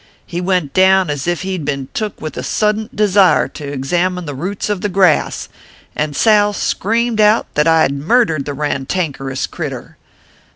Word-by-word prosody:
He 175 +1 -4
went 180 -6 -1
down 190 -3 +4
as 145 +2 -4
ef 175 +1 -1
he 190 -1 -3
d - - -6
been 140 -2 -3
took 215 -2 -4
with 155 - -6
a - - -4
suddint 215 +3 -1
desire 195 -9 +4
to 145 0 -8
examine 175 +6 -1
the 145 - -5
roots 185 +9 -4
of 205 -3 -2
the 205 - -1
grass, 185 -4 +2 0.5
and 150 -1 -2
Sal 210 +1 +4
screamed 225 +3 0
out 210 +2 +4
that 150 +2 +2
I 160 -1 +4
d 140 - -4
murdered 155 - +1
the 145 - -4
rantankerous 140 -1 -2
critter. - - -7
180 Hz, 175 wpm, -16 LUFS, 145-205 Hz, 0.5 s, down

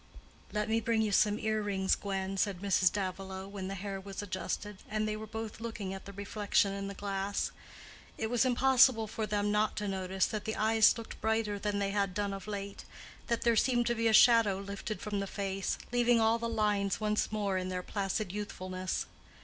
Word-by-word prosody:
"Let 210 0 -1
me 225 +1 +2
bring 225 0 +1
you 215 - 0
some 210 +1 +3
earrings, 205 -3 0
Gwen," 195 -1 -2
said 195 -2 0
Mrs. 185 -2 +3
Davilow, 190 -1 -4
when 195 -1 -6
the 195 - -4
hair 195 0 -5
was 195 +1 -6
adjusted, 200 +1 -4
and 215 0 0
they 215 - -1
were 215 0 -7
both 220 -1 -6
looking 220 -4 -4
at 195 - -8
the 200 - -9
reflection 200 0 +1
in 195 0 -4
the 200 - -6
glass. 200 0 -2 0.7
It 220 - -1
was 245 -2 +3
impossible 255 -2 +5
for 215 0 -3
them 205 0 0
not 210 0 +1
to 210 - -2
notice 190 -1 0
that 215 -1 -4
the 220 - -2
eyes 220 +2 +4
looked 230 - -9
brighter 220 -2 0
than 205 0 -1
they 200 -1 0
had 200 -2 0
done 205 -1 -1
of 195 +1 -7
late, 200 -1 -5 0.4
that 235 - 0
there 235 -1 +4
seemed 240 +1 +3
to 240 - +2
be 230 -1 +1
a - - +4
shadow 220 -3 +6
lifted 200 +2 -5
from 210 -3 -2
the 195 - -2
face, 195 -1 -2
leaving 240 -1 +4
all 225 +1 +3
the 230 0 -2
lines 210 -3 +1
once 210 -1 0
more 200 -3 0
in 185 0 -3
their 180 -1 -3
placid 195 0 -2
youthfulness. 185 -2 -3
205 Hz, 205 wpm, -32 LUFS, 195-220 Hz, 0.7 s, shadow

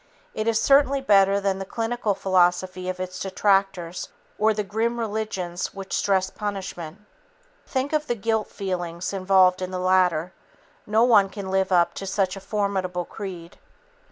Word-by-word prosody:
It 215 +1 -3
is 225 -1 +2
certainly 275 +1 +4
better 200 -5 +4
than 195 -1 -1
the 195 - -6
cynical 225 -3 -1
philosophy 185 0 +1
of 185 0 -4
its 185 0 -5
detractors 195 -3 0 0.3
or 215 +1 +4
the 210 -1 -1
grim 225 +4 -1
religions 205 -6 -3
which 195 -1 -5
stress 190 -1 +1
punishment. 195 -4 -6 0.7
Think 270 +3 -2
of 305 0 0
the 240 - 0
guilt 220 0 -1
feelings 175 -2 -4
involved 185 -1 +3
in 185 - -3
the 185 - -4
latter. 180 -2 +2 0.5
No 220 +2 +3
one 210 -5 +5
can 195 -1 -6
live 190 0 +1
up 175 -2 +3
to 195 - -6
such 190 -1 0
a - - -7
formidable 190 -3 -2
creed. 180 -5 -8
195 Hz, 155 wpm, -24 LUFS, 185-215 Hz, 0.7 s, one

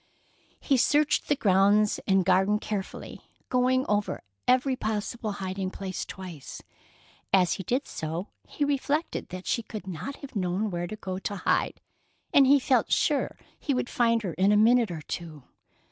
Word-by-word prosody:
He 275 - +2
searched 295 +4 +2
the 290 - +3
grounds 205 -2 +3
and 190 -2 +3
garden 190 +3 +3
carefully, 210 -2 -5 0.3
going 255 +1 +2
over 205 0 -1 0.2
every 255 +1 +3
possible 215 -1 -3
hiding 190 -1 -3
place 190 -1 -5
twice. 180 -7 -9 0.7
As 185 -2 +4
he 190 - -5
did 255 +9 -1
so, 165 +5 -4 0.2
he 290 - -1
reflected 290 +3 -1
that 185 +1 -7
she 235 - 0
could 215 -3 -8
not 190 - -5
have 275 -3 -11
known 195 +2 -1
where 175 0 -3
to 215 - -6
go 190 -3 -5
to 205 - -4
hide, 190 - 0 0.5
and 275 -2 +7
he 280 +1 +6
felt 255 -3 +1
sure 295 -3 +1 0.2
he 280 - -1
would 250 - -1
find 230 -2 +2
her 180 -5 -3
in 190 +5 +3
a 210 - +5
minute 230 +1 +5
or 160 -3 -6
two. 160 -5 -7
210 Hz, 165 wpm, -27 LUFS, 185-250 Hz, 0.7 s, and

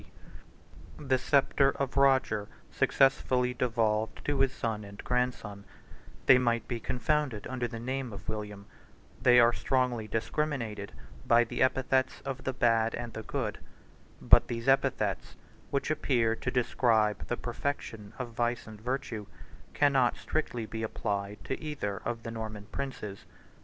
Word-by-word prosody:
] - - -20
The 130 -1 +4
sceptre 140 0 +3
of 140 -2 -2
Roger 130 -7 +3 0.2
successively 130 -2 +2
devolved 110 -3 0
to 145 -2 0
his 135 -1 +3
son 110 -5 -3
and 100 0 -11
grandson: 125 -5 -2 0.6
they 125 -1 +8
might 120 -2 0
be 120 - -3
confounded 125 -1 -1
under 125 -2 -2
the 115 -1 -7
name 130 +1 -3
of 100 - -10
William: 105 -2 -5 0.6
they 125 -1 +7
are 120 0 +6
strongly 125 -4 0
discriminated 115 -3 -2 0.4
by 120 0 +6
the 115 - -4
epithets 130 0 +2
of 135 -1 -6
the 130 - +1
bad 115 -2 +2
and 120 -1 -6
the 110 - -5
good; 110 -1 -3 0.6
but - - +6
these 115 0 -4
epithets, 135 0 +1 0.3
which 140 +2 -1
appear 120 -7 +1
to 130 - -3
describe 115 -4 +2
the 120 - -1
perfection 115 -4 -4
of 125 -2 -4
vice 120 0 -1
and 110 -1 -11
virtue, 120 -4 -3 0.5
cannot 135 -4 +3
strictly 120 -7 -2
be 110 +1 -6
applied 105 -2 -3
to 135 - -4
either 145 -11 -3
of 115 -1 -3
the 115 - -5
Norman 110 -2 -6
princes. 105 -8 -5
120 Hz, 145 wpm, -30 LUFS, 110-130 Hz, 0.6 s, they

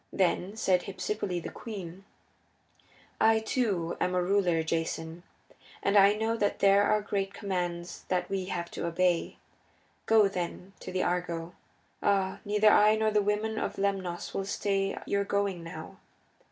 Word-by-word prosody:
Then 190 +2 0
said 185 -4 +2
Hypsipyle, 190 -2 -3
the - - -6
queen, 195 -4 -8 1.1
"I, 220 0 +5
too, 215 -7 -1
am 180 - +1
a 180 - +2
ruler, 180 -3 +2
Jason, 165 +1 -3 0.6
and 200 - +2
I 200 0 +7
know 220 +1 0
that 205 -3 0
there 200 0 +5
are 210 0 +2
great 200 -1 -2
commands 175 -4 -4
that 180 -1 0
we 195 -1 -2
have 170 -2 -4
to - - -3
obey. 175 0 +1 0.7
Go, 220 -2 +6
then, 180 0 -5
to - - -7
the 185 0 0
Argo. 175 -1 -2 0.5
Ah, 195 -2 +1
neither 210 +1 +4
I 215 +1 +6
nor 220 0 +1
the 210 0 +3
women 210 +2 -1
of - - -3
Lemnos 195 -3 -2
will 195 - -2
stay 195 0 -1
your 200 0 0
going 200 -3 -1
now. 165 -1 -9
195 Hz, 155 wpm, -29 LUFS, 175-205 Hz, 1.1 s, I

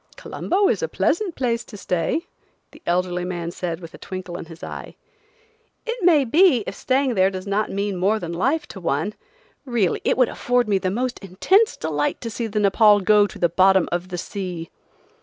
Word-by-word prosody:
"Colombo 390 +2 0
is 465 - +1
a 485 - 0
pleasant 375 -5 0
place 235 -3 -1
to 210 - -11
stay," 180 - -1 0.5
the - - -16
elderly 180 0 0
man 175 -2 -4
said 170 -2 -4
with 165 -1 -11
a - - -12
twinkle 185 -2 -7
in 175 - -6
his 165 0 -13
eye. - - -7 0.9
"It 470 -3 -4
may 315 -6 +5
be, 285 - +4
if - - -5
staying 260 +3 0
there 190 -2 +3
does 185 0 -6
not 205 +1 0
mean 200 -1 -2
more 200 +5 +2
than 170 -4 -5
life 285 - 0
to 195 - -8
one. 170 +4 -1 0.5
Really, 235 -9 0
it - - +1
would 255 -2 +4
afford 245 -1 0
me 200 -2 +2
the 185 - -1
most 245 +5 -2
intense 370 - +2
delight 150 -2 -1
to 230 - -5
see 230 +1 -3
the 215 0 -5
Nepaul 205 0 +5
go 205 +1 +5
the 175 -2 0
bottom 190 +2 +4
of 175 +1 -2
the 180 -1 -5
sea." 180 -3 -5
200 Hz, 195 wpm, -22 LUFS, 180-245 Hz, 0.9 s, may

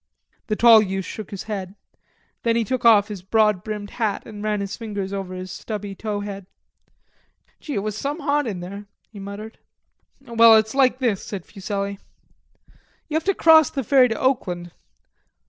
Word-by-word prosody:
The 215 - 0
tall 230 -1 +7
youth 190 -2 -3
shook 215 -3 -7
his 200 - -6
head. 195 -3 -5 0.7
Then 230 -1 +1
he 230 - +2
took 250 +3 -3
off 210 -3 +6
his 205 -4 -6
broad 210 -1 +2
brimmed 210 -1 -6
hat 215 -4 -2
and 210 -2 -9
ran 210 -1 0
his 200 -1 -4
fingers 205 -4 -5
over 190 -2 -5
his 185 0 -7
stubby 205 0 -6
tow 205 +1 -4
head. 200 -2 -7 1.1
"Gee, 295 - -6
it 200 - -1
was 215 -1 -3
some 285 +7 -3
hot 290 -1 +1
in 190 -5 -4
there," 200 +3 -8 0.2
he 210 - -11
muttered. 200 +3 -8 0.6
"Well, 230 -3 +6
it's 220 0 +2
like 260 -2 +3
this," 235 -7 -1
said 195 -4 -7
Fuselli. 200 0 -4 1.1
"You - - -6
have 320 - +1
to 395 0 +2
cross 320 -3 +6
the 270 - -3
ferry 260 +1 +5
to 225 -2 -3
Oakland. 180 -10 -1
210 Hz, 180 wpm, -22 LUFS, 200-235 Hz, 1.1 s, tall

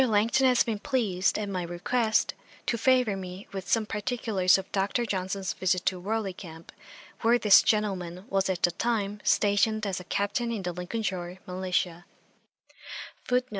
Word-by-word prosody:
Langton 230 +5 +3
has 250 -1 +4
been 220 -3 -3
pleased, 210 -9 0
at 210 -1 -3
my 190 -2 -2
request, 220 +7 0 0.3
to - - 0
favour 250 -2 +3
me 185 +1 -8
with 190 -1 -5
some 225 -2 +2
particulars 210 -4 +1
of 190 - -7
Dr. 200 +5 0
Johnson's 190 -2 -2
visit 185 -1 0
to 185 - 0
Warley 205 +1 -2
camp, 165 -3 -11 0.5
where 235 +1 +4
this 210 -4 +7
gentleman 190 -4 -1
was 195 0 0
at 180 -2 -2
the 175 - +5
time 210 0 -1
stationed 210 +1 +2
as 195 -3 -2
a - - -9
Captain 205 +6 -1
in 215 -4 -3
the 180 - -2
Lincolnshire 180 -1 -4
militia. 180 -1 -2
200 Hz, 155 wpm, -28 LUFS, 185-225 Hz, 0.5 s, this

